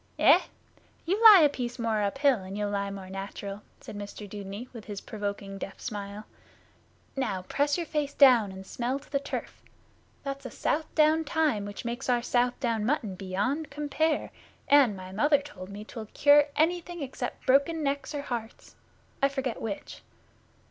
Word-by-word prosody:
'Eh? -, -, +7 dB, 0.7 s
You 385 Hz, +6 st, 0 dB
lie 420 Hz, -5 st, +11 dB
a 300 Hz, -, +7 dB
piece 250 Hz, -4 st, -4 dB
more 225 Hz, -3 st, 0 dB
uphill 275 Hz, +6 st, +2 dB
and 190 Hz, +2 st, -7 dB
you'll 205 Hz, -1 st, -1 dB
lie 200 Hz, -1 st, -1 dB
more 195 Hz, -1 st, -7 dB
natural,' 195 Hz, +1 st, -6 dB, 0.2 s
said -, -, -9 dB
Mr 205 Hz, 0 st, -7 dB
Dudeney, 200 Hz, +3 st, -7 dB
with 230 Hz, -3 st, -9 dB
his 205 Hz, -2 st, -6 dB
provoking 200 Hz, -2 st, -5 dB
deaf 195 Hz, -, -7 dB
smile. 205 Hz, -2 st, -6 dB, 0.9 s
'Now 195 Hz, -9 st, -2 dB
press 285 Hz, -, 0 dB
your 345 Hz, -, -2 dB
face 295 Hz, -2 st, -2 dB
down 245 Hz, -8 st, +6 dB
and 190 Hz, 0 st, -9 dB
smell 250 Hz, +6 st, -2 dB
to 280 Hz, -, -15 dB
the 280 Hz, -, +1 dB
turf. 280 Hz, -, -6 dB, 0.6 s
That's 275 Hz, -2 st, -5 dB
Southdown 310 Hz, +1 st, +2 dB
thyme 295 Hz, -10 st, +1 dB
which 205 Hz, +3 st, -7 dB
makes 240 Hz, +3 st, -4 dB
our 240 Hz, -1 st, +2 dB
Southdown 245 Hz, -2 st, 0 dB
mutton 225 Hz, -5 st, 0 dB
beyond 205 Hz, -, -2 dB
compare, 300 Hz, +1 st, -1 dB, 0.4 s
and, 270 Hz, -8 st, +5 dB
my 185 Hz, 0 st, -9 dB
mother 290 Hz, +9 st, +3 dB
told 205 Hz, -11 st, -10 dB
me, 205 Hz, +1 st, -8 dB
'twill 220 Hz, -1 st, -8 dB
cure 290 Hz, 0 st, +6 dB
anything 345 Hz, +1 st, 0 dB
except 255 Hz, -2 st, -6 dB
broken 280 Hz, +5 st, +3 dB
necks, 280 Hz, +1 st, -2 dB
or 285 Hz, -, -3 dB
hearts. 235 Hz, -3 st, -6 dB, 0.5 s
I 275 Hz, -, +4 dB
forget 265 Hz, -3 st, -3 dB
which. 210 Hz, -3 st, -6 dB
245 Hz, 160 wpm, -28 LUFS, 205-285 Hz, 0.9 s, lie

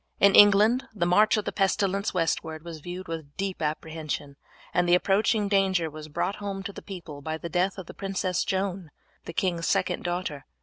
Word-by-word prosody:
In 200 Hz, 0 st, +6 dB
England 205 Hz, +5 st, +6 dB
the 175 Hz, -4 st, 0 dB
march 210 Hz, +6 st, +4 dB
of 210 Hz, -, -2 dB
the -, -, -2 dB
pestilence 200 Hz, 0 st, +1 dB
westward 160 Hz, -2 st, -2 dB
was 165 Hz, -2 st, -7 dB
viewed 180 Hz, +4 st, -7 dB
with 160 Hz, -3 st, -7 dB
deep 195 Hz, -2 st, -3 dB
apprehension, 155 Hz, -2 st, -3 dB, 0.4 s
and 175 Hz, 0 st, +2 dB
the 175 Hz, -, +7 dB
approaching 205 Hz, +3 st, +2 dB
danger 190 Hz, -5 st, +2 dB
was 155 Hz, 0 st, -9 dB
brought 190 Hz, +6 st, -2 dB
home 200 Hz, -2 st, -5 dB
to 200 Hz, -, -6 dB
the -, -, -9 dB
people 170 Hz, -7 st, -9 dB
by 155 Hz, +2 st, -3 dB
the 170 Hz, -, -6 dB
death 185 Hz, +3 st, 0 dB
of 190 Hz, -, -7 dB
the -, -, -10 dB
Princess 190 Hz, -2 st, -1 dB
Joan, 190 Hz, -3 st, -2 dB, 0.4 s
the 170 Hz, -, -7 dB
king's 170 Hz, -1 st, 0 dB
second 190 Hz, -2 st, +1 dB
daughter. 175 Hz, -5 st, -3 dB
180 Hz, 190 wpm, -27 LUFS, 165-195 Hz, 0.4 s, the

